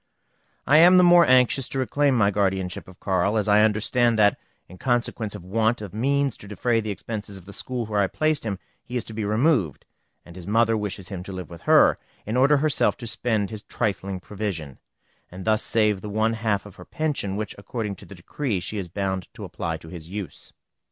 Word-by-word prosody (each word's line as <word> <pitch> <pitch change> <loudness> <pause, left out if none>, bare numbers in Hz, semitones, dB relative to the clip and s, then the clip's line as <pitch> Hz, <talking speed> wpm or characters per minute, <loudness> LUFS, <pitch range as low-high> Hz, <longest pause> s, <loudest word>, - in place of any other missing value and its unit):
I 150 +2 +6
am 180 +2 +8
the 180 - +7
more 175 -1 +7
anxious 130 +1 +3
to - - -4
reclaim 135 +1 +1
my 100 -3 +3
guardianship 95 -2 -1
of 90 0 -15
Carl, 95 +2 +1
as 105 -1 0
I 105 +1 +5
understand 110 +2 +2
that, 105 -1 +4 0.3
in 90 - -14
consequence 120 -4 -1
of - - -9
want 110 +4 +1
of 100 - -8
means 140 +3 0
to 105 - -12
defray 115 +3 0
the 110 - -5
expenses 100 0 -6
of 90 - -14
the 100 - -11
school 125 +1 -3
where 105 -1 -1
I 100 - +2
placed 155 +6 0
him, 105 -4 -3 0.3
he 125 - -4
is 120 - -2
to 110 - -11
be 110 0 -3
removed, 110 - +1 0.4
and 85 - -13
his 90 -2 -9
mother 115 +2 +3
wishes 100 -3 -4
him 95 -3 -5
to 95 - -7
live 90 -1 -7
with 85 - -10
her, - - +6 0.3
in 110 - -3
order 140 +3 +5
herself 150 0 +1
to 120 - -8
spend 110 -4 -1
his 110 -1 -6
trifling 100 -4 -3
provision, 90 -8 -5 0.5
and 90 +1 -9
thus 110 0 +3
save 105 -3 +2
the 105 - -6
one 110 +2 +1
half 110 -3 -1
of 105 - -13
her - - -11
pension, 145 -11 -2
which, 105 0 -3
according 105 0 -4
to - - -11
the 100 - -11
decree, 105 +4 -3
she 100 +4 -4
is 90 -3 -6
bound 95 0 -3
to - - -8
apply 80 -1 -4
to 80 - -14
his 85 -2 -9
use. 100 -4 -7
105 Hz, 220 wpm, -24 LUFS, 95-120 Hz, 0.5 s, am